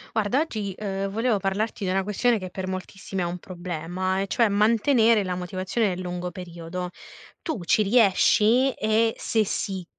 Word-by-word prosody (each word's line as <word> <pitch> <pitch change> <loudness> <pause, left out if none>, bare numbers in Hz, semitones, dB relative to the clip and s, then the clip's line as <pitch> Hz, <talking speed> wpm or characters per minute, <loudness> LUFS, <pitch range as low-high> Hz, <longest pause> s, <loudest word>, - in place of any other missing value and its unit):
Guarda 220 +6 +2
oggi, 215 -11 -3
ehm, 195 -1 -3
volevo 225 +1 +1
parlarti 200 +2 -2
di - - -1
una 190 +1 +1
questione 225 +4 +1
che 185 -3 -6
per 185 +1 -5
moltissimi 190 0 -5
è - - 0
un 175 +1 -3
problema, 180 +1 -3
e 195 - -1
cioè, 230 +3 +2
mantenere 225 +2 +4
la 185 -1 -2
motivazione 185 +5 -1
nel 185 -1 -3
lungo 180 0 -4
periodo. 180 -1 -6 0.5
Tu 310 - -4
ci 175 - +3
riesci? 225 +4 +4
E 220 +1 +2
se 220 -2 +1
sì, 190 -2 -3
195 Hz, 170 wpm, -25 LUFS, 185-220 Hz, 0.5 s, mantenere